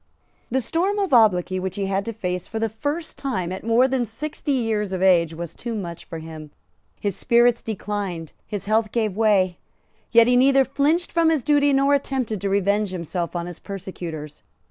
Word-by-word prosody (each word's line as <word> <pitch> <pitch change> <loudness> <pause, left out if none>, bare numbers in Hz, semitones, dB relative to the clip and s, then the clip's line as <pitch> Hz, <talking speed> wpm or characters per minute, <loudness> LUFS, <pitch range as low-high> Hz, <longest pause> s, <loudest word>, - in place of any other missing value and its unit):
The 265 +2 +1
storm 360 - 0
of 395 -7 0
obloquy 185 -5 +4
which 190 0 -4
he 200 - -2
had 195 +1 -1
to 230 - -3
face 180 -5 -4
for 225 - -5
the 225 0 0
first 290 +9 -4
time 190 -11 -2
at 190 - -6
more 230 +3 +4
than 260 -2 0
sixty 285 +6 -4
years 220 -6 -1
of 185 0 -1
age 170 -4 +4
was 170 -1 -6
too 235 -2 -5
much 175 -5 -6
for 165 - -7
him. 160 -1 -9 0.5
His 200 -3 -2
spirits 240 0 +3
declined; 200 -6 -4 0.2
his 205 -2 -5
health 215 0 +1
gave 220 -5 0
way; 200 -5 +2 0.5
yet 230 0 +7
he 245 +1 +3
neither 270 +1 +5
flinched 300 +6 +1
from 335 -1 +3
his 310 -6 +1
duty 290 -1 +3
nor 275 +1 +3
attempted 260 -7 -1
to 200 - -1
revenge 200 +1 +1
himself 175 -1 -4
on 170 -1 -2
his 175 -2 -8
persecutors. 170 -6 -7
215 Hz, 190 wpm, -23 LUFS, 185-260 Hz, 0.5 s, yet